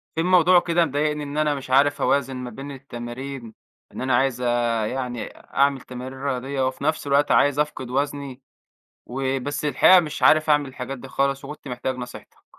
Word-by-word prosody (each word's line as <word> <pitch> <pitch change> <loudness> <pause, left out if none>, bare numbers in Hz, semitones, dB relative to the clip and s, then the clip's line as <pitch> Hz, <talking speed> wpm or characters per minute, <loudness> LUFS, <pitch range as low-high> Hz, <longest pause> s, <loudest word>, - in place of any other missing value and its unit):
في 165 - 0
موضوع 180 0 +5
كده 170 0 +2
مضايقني، 150 +1 -1
إن 145 +1 -6
أنا 150 -1 +2
مش 135 -1 -8
عارف 140 +2 +3
أوازن 135 -1 +1
ما 125 -1 -5
بين 135 +4 -8
التمارين، 125 -1 -7 0.4
إن - - -7
أنا 130 -1 +1
عايز 130 -1 +1 0.5
يعني 125 -2 -4
أعمل 140 -1 0
تمارين 130 +1 -8
رياضية، 135 0 -1
وفي 130 +1 -5
نفس 155 -1 -1
الوقت 140 +1 +3
عايز 145 0 +4
أفقِد 150 -4 -2
وزني، 140 0 -3 0.7
وبس 135 +2 -3
الحقيقة 180 +5 +6
مش 155 -3 -6
عارف 155 0 +5
أعمل 145 -2 +3
الحاجات 130 +1 -6
دي 135 - -10
خالص، 140 +1 -1
وكنت 150 0 -9
محتاج 125 +1 -3
نصيحتك. 125 -1 -10
135 Hz, 170 wpm, -23 LUFS, 130-145 Hz, 0.7 s, الحقيقة